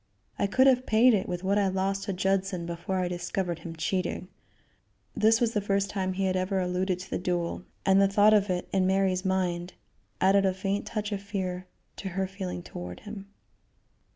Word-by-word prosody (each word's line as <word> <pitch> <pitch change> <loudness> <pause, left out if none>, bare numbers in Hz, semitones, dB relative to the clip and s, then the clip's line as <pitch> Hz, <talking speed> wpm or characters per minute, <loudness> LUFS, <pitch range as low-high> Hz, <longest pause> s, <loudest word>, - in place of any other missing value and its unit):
I 200 - +2
could 260 +6 +4
have 255 -1 +4
paid 230 +3 +5
it 195 -3 0
with 175 +1 -3
what 200 +2 +2
I 200 - +2
lost 195 +1 -1
to 200 - -2
Judson 190 -1 0
before 170 +2 -3
I 180 -1 0
discovered 175 0 -3
him 165 -1 -8
cheating." 185 +3 -2 0.9
This 225 +1 +4
was 230 -1 +1
the 210 - +1
first 200 0 0
time 190 -2 -1
he 195 +1 -1
had 185 0 +1
ever 185 +1 0
alluded 180 0 0
to 190 - -10
the - - -1
duel, 175 0 -2 0.2
and 195 0 +5
the 195 - +5
thought 205 +2 +5
of 205 -1 +3
it, 180 -1 -1
in 190 -1 +3
Mary's 190 -1 +2
mind, 180 -2 -1 0.5
added 195 +1 +4
a 190 -1 +1
faint 195 +1 -2
touch 210 -1 -3
of 200 -1 -2
fear 185 -3 -4 0.3
to 195 - -5
her 190 - +1
feeling 185 -2 -5
toward 90 - -8
him. 205 -2 -8
190 Hz, 200 wpm, -28 LUFS, 180-200 Hz, 0.9 s, paid